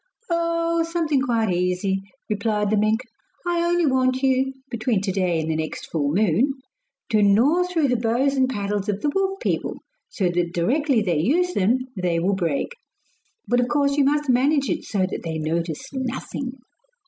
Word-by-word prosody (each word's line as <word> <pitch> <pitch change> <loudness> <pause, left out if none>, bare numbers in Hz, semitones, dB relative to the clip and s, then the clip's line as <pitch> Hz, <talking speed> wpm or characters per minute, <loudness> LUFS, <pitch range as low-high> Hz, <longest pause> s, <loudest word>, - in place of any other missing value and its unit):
'Oh, 335 0 +1
something 330 -4 0
quite 230 -7 +1
easy,' 180 +2 0 0.3
replied 210 -1 0
the - - +3
mink. 215 +2 +2 0.4
'I 345 -1 +1
only 345 -1 +2
want 260 -1 +1
you 265 0 +2 0.2
between 235 -2 0
to 200 -1 -1
day 180 -3 0
and 160 - -2
the - - -1
next 155 0 -5
full 145 -3 0
moon 215 - +2 0.6
to 215 -4 +3
gnaw 245 - +4
through 330 -5 +1
the 250 - +1
bows 240 +4 +1
and 260 -2 +2
paddles 205 -3 -2
of 205 0 -1
the 295 - +1
wolf 390 0 0
people, - - -1 0.3
so 195 -8 0
that 175 0 -1
directly 250 - +2
they 175 -6 +1
use 350 - +2
them 205 +6 +3 0.2
they 180 -3 0
will 185 +4 +1
break. 170 - -1 0.7
But 245 - +2
of 245 - +2
course 280 +2 +1
you 285 - +3
must 295 +2 +1
manage 275 +3 +2
it - - -3
so 195 -3 0
that - - -5
they 160 -1 -3
notice 160 - -3
nothing. 260 0 -4
235 Hz, 180 wpm, -23 LUFS, 190-280 Hz, 0.7 s, gnaw